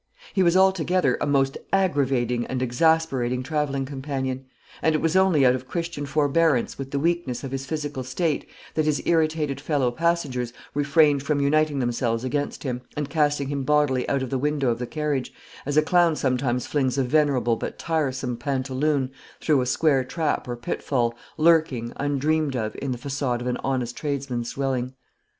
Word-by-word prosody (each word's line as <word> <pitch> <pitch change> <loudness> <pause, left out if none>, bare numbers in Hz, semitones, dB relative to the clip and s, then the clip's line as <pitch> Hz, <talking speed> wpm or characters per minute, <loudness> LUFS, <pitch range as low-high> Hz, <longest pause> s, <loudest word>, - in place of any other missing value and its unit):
He 190 - +2
was, 175 0 +4
altogether, 185 -6 +3
a - - 0
most 135 -1 +1
aggravating 135 -10 +1
and 130 - -2
exasperating 130 -2 +1
travelling 140 -2 -1
companion; 135 -1 -4 0.4
and 160 -1 +2
it - - +4
was 165 +2 0
only 190 -7 +4
out 125 - +6
of 130 0 -5
Christian 165 -4 -4
forbearance 145 -2 +2
with 135 -1 -5
the 140 - -2
weakness 160 -5 -1
of 135 - -5
his 135 0 -4
physical 145 -4 -3
state 150 +4 -1 0.2
that 155 - +1
his 155 -1 0
irritated 155 -4 +1
fellow 140 -4 +1
passengers 135 -5 -1 0.2
refrained 145 0 +3
from 145 +1 0
uniting 150 +1 +2
themselves 120 -2 0
against 145 +3 -2
him, 125 -3 -3 0.2
and 150 -1 -3
casting 145 -3 +1
him 140 -1 -2
bodily 145 -2 +2
out 135 -1 +1
of 130 - -5
the 135 - 0
window 145 -2 +1
of 115 - -3
the 125 - -3
carriage; 150 -3 -2 0.4
as 145 +1 0
a 155 - +6
clown 175 -1 +3
sometimes 125 -2 0
flings 135 -3 0
a 135 - +3
venerable 130 -4 +2
but - - -5
tiresome 135 -6 -1
pantaloon 135 +1 -1 0.3
through 150 -4 +2
a 125 - -2
square 140 -1 +2
trap 155 +2 -2
or 120 - -3
pitfall, 120 0 -1 0.2
lurking, 155 -8 +3
undreamed 145 +1 0
of, 110 -3 -2
in 135 - -2
the 125 - -2
façade 135 -2 -2
of 120 - -6
an 125 0 -1
honest 125 -3 -2
tradesman's 135 -5 -3
dwelling. 130 -2 -2
140 Hz, 175 wpm, -24 LUFS, 130-155 Hz, 0.4 s, out